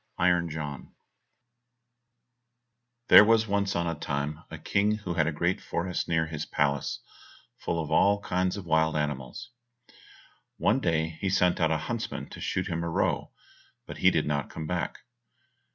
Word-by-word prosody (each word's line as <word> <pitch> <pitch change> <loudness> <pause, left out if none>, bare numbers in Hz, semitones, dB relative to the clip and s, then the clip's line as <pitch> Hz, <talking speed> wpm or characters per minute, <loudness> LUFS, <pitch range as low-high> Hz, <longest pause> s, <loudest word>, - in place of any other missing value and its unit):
136 85 -2 +1
Iron 75 -1 -3
John - - -22 2.1
There - - +11
was 110 +1 +4
once 100 -1 0
on 85 0 0
a 85 - -1
time 75 +1 -3
a - - -7
King 105 +2 +1
who 105 -5 -5
had 80 -2 +1
a - - +1
great 85 +4 -1
forest 90 +1 -3
near 80 -1 +1
his 75 -2 -5
palace, 70 -2 -1 0.6
full 85 - -2
of 80 -1 -4
all 100 +5 +4
kinds 90 -1 -1
of 100 - -7
wild 80 -1 +2
animals. 75 - -4 1.1
One 120 - +2
day 80 -5 -1
he 95 - 0
sent 90 -1 +2
out 80 - +3
a 80 - +1
huntsman - - -4
to - - -9
shoot - - -1
him 85 0 -2
a 85 - -2
roe, 80 - 0 0.6
but - - -8
he - - +5
did - - +1
not 70 -2 -2
come 80 - -6
back. 85 +2 -3
85 Hz, 170 wpm, -28 LUFS, 80-95 Hz, 2.1 s, There